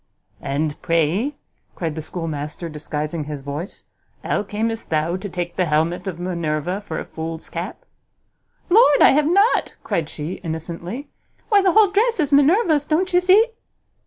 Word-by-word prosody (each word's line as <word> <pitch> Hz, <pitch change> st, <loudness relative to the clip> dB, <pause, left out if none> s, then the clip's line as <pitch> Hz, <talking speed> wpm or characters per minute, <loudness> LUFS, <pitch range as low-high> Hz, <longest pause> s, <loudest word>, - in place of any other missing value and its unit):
"And 145 Hz, +2 st, -2 dB
pray," 170 Hz, -, +1 dB, 0.4 s
cried 165 Hz, -3 st, -3 dB
the 160 Hz, -, -5 dB
schoolmaster, 155 Hz, 0 st, -5 dB
disguising 150 Hz, 0 st, -4 dB
his 150 Hz, -1 st, -6 dB
voice, 145 Hz, +6 st, -6 dB, 0.4 s
"how -, -, 0 dB
camest 220 Hz, +2 st, -3 dB
thou 160 Hz, +2 st, 0 dB
to 195 Hz, +2 st, -5 dB
take 175 Hz, -1 st, -4 dB
the 185 Hz, -, +2 dB
helmet 160 Hz, +4 st, 0 dB
of 175 Hz, -3 st, -4 dB
Minerva 175 Hz, +1 st, -2 dB
for 165 Hz, -6 st, -6 dB
a -, -, -4 dB
fool's 160 Hz, 0 st, -6 dB
cap?" 185 Hz, -, -6 dB, 0.9 s
"Lord, 375 Hz, -8 st, +6 dB
I -, -, +8 dB
have 295 Hz, +2 st, +3 dB
not," 400 Hz, +7 st, +3 dB
cried 160 Hz, -2 st, -1 dB
she, 155 Hz, +4 st, -6 dB
innocently, 170 Hz, -, -5 dB, 0.4 s
"why, 410 Hz, -3 st, +5 dB
the 375 Hz, -3 st, +3 dB
whole 425 Hz, -3 st, +5 dB
dress 445 Hz, +2 st, +2 dB
is 300 Hz, -2 st, +1 dB
Minerva's; 300 Hz, +2 st, +4 dB
don't 360 Hz, +5 st, 0 dB
you 355 Hz, -, +6 dB
see?" 380 Hz, +5 st, +5 dB
180 Hz, 160 wpm, -21 LUFS, -, 0.9 s, I